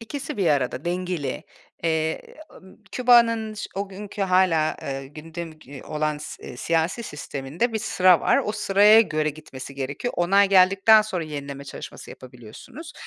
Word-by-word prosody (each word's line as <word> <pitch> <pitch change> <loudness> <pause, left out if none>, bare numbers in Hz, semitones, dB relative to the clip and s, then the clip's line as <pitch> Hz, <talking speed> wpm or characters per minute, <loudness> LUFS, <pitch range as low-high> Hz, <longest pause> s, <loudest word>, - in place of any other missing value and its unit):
İkisi 280 +5 -6
bir 190 -4 0
arada, 135 -2 0
dengeli. 175 -5 -3 0.4
Eee, 160 -1 0 0.4
ımm, 190 0 -17 0.2
Küba'nın 230 -3 +3
ş 205 - -6
o 200 0 -3
günkü 200 +1 -6
hâlâ, 180 -4 +2
eee, 135 0 -5
gündem 160 +3 -8
ge 140 -2 -12
olan, 155 -1 -2
s 150 - -9
eee, 125 - -9
siyasi 165 - -1
sisteminde 150 - -4
bir 220 - -1
sıra 185 -4 +3
var. - - +3
O 210 - -2
sıraya 210 +1 +5
göre 155 -8 0
gitmesi 140 -3 -10
gerekiyor. 140 - -4
Onay 195 +3 +3
geldikten 195 +3 +6
sonra 185 -6 -4
yenileme 140 -2 -7
çalışması 140 - -10
yapabiliyorsunuz. 125 - -12
175 Hz, 150 wpm, -24 LUFS, 150-205 Hz, 0.4 s, geldikten